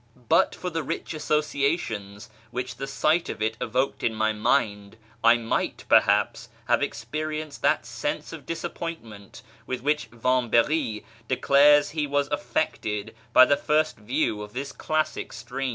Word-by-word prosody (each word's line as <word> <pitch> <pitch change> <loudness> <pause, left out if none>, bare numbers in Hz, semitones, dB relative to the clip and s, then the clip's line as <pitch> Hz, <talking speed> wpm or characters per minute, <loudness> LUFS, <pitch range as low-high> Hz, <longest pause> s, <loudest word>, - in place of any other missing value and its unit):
But - - +3
for 180 - -5
the 165 0 -1
rich 150 - -4
associations 140 - -1 0.2
which 125 -1 -5
the 135 - -4
sight 155 +4 +1
of - - -5
it 110 +1 0
evoked 130 +4 -1
in 110 - 0
my 110 0 +1
mind, 105 -2 0 0.3
I 115 +1 +7
might 115 -1 -2
perhaps 105 +4 +3 0.2
have 120 +2 +3
experienced 155 +1 -4
that - - +2
sense - - -4
of - - -10
disappointment 165 - -6 0.2
with 130 - -3
which 150 +3 0
Vamb^ry 120 +1 +1 0.2
declares 145 +3 +5
he 150 -1 -1
was 145 0 0
affected 110 -6 -2 0.2
by 130 - +8
the 145 - +3
first 155 +2 +1
view 105 0 -1
of 105 0 -9
this 140 +3 -4
classic 155 0 -2
stream. 135 +1 -4
130 Hz, 145 wpm, -26 LUFS, 110-150 Hz, 0.3 s, by